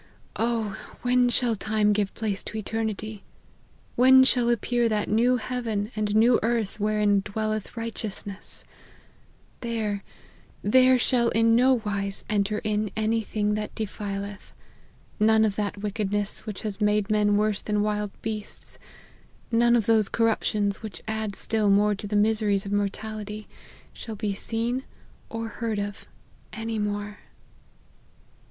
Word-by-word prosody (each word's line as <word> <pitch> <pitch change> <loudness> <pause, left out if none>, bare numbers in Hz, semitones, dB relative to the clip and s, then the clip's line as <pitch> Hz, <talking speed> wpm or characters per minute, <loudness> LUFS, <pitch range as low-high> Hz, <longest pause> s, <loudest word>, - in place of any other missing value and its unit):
Oh! 225 -2 0 0.3
when 250 0 +3
shall 240 -2 +2
time 215 0 +1
give 205 -1 0
place 210 -3 -1
to 220 - -5
eternity! 215 -1 -3 0.7
When 260 +1 +7
shall 245 -2 +3
appear 240 0 +1
that 210 -1 0
new 240 +4 +3
heaven 230 -3 -3
and 210 -1 -1
new 235 +2 +5
earth 225 -2 -1
wherein 210 -1 +2
dwelleth 215 +2 -3
righteousness! 215 -3 -5 0.9
There, 220 -4 -2 0.6
there 255 +4 +5
shall 245 -1 +2
in 225 +1 +3
no 250 0 +4
wise 200 -1 -2
enter 210 0 0
in 215 0 0
any 220 +1 +1
thing 210 -1 -1
that 210 0 -4
defileth: 200 -2 -5 0.7
none 220 +1 +5
of 205 -2 0
that 205 -1 -2
wickedness 205 0 -1
which 210 -3 -5
has 210 -1 -4
made 210 0 +2
men 205 -1 +3
worse 210 -1 +1
than 210 -1 0
wild 210 -1 -1
beasts, 215 -1 -6 0.7
none 235 +1 +4
of 230 -3 +2
those 220 -2 +3
corruptions 215 -3 +1
which 215 -3 -8
add 220 -2 -2
still 215 0 0
more 205 +1 +4
to 205 +1 -6
the 210 - -2
miseries 210 -1 +2
of 200 - -5
mortality, 210 +1 -3 0.5
shall 225 - -7
be 205 -1 -2
seen 230 +5 -2 0.5
or 225 0 -4
heard 225 -2 -3
of 205 0 -5 0.5
any 225 0 -3
more." 205 0 -3
215 Hz, 135 wpm, -26 LUFS, 205-225 Hz, 0.9 s, When